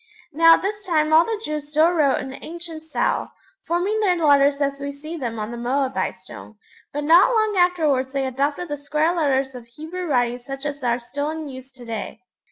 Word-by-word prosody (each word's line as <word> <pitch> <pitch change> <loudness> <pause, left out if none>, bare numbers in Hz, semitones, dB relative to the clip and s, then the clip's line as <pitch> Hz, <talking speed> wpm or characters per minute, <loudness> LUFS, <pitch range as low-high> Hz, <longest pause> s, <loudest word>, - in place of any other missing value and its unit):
Now 330 +2 +7
at - - -5
this 410 +1 -3
time 315 -4 +1
all 320 +2 +7
the 450 -2 -3
Jews 300 -1 -4
still 310 +3 +4
wrote 300 -6 +2
in - - -5
the 265 - -10
ancient 335 -1 -6
style, 320 -1 -2 0.3
forming 370 +6 0
their 390 -4 +3
letters 285 -3 +4
as 280 -1 -1
we 280 0 -3
see 305 +4 -8
them 240 -7 -4
on 215 +1 -4
the 240 - -6
Moabite 255 -4 -1
Stone; 190 +3 -12 0.4
but 295 +1 -3
not 335 +9 +6
long 435 -3 +1
afterwards 315 -8 +2
they 275 -1 -1
adopted 285 +6 -2
the 290 -1 -4
square 305 +4 0
letters 270 -4 +1
of 245 -2 -10
Hebrew 320 +9 -7
writing 245 -4 +1
such 270 +3 -7
as 285 -2 -4
are 240 -1 +1
still 285 +5 -4
in 315 -1 -5
use 260 -1 -10
to 250 -2 -13
day. 225 -2 -6
290 Hz, 210 wpm, -22 LUFS, 265-330 Hz, 0.4 s, Now